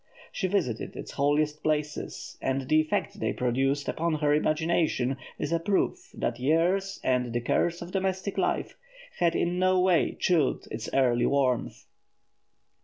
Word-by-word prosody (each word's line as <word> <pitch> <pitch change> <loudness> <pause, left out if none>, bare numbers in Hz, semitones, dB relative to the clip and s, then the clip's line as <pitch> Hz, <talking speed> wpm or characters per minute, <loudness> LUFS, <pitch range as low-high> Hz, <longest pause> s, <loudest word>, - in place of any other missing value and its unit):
She 190 - -1
visited 175 - -1
its - - -7
holiest 150 +2 +1
places, 150 -1 -2
and 135 0 -1
the 155 +2 +5
effect 200 +5 -2
they - - -1
produced 135 +3 0
upon 165 0 0
her 150 -1 +2
imagination 155 -4 +1 0.2
is 150 - -3
a 170 - +2
proof 205 - 0
that 120 0 -2
years 175 +8 +1
and 125 -2 +1
the 120 - 0
cares 170 +8 0
of 170 - -9
domestic 190 +1 -1
life - - -1 0.4
had 170 -1 +2
in 175 +1 0
no 185 0 +3
wise 180 -2 +3
chilled 165 -7 +1
its 110 +1 -5
early 120 -3 +3
warmth. 130 -4 0
155 Hz, 150 wpm, -28 LUFS, 135-180 Hz, 0.4 s, the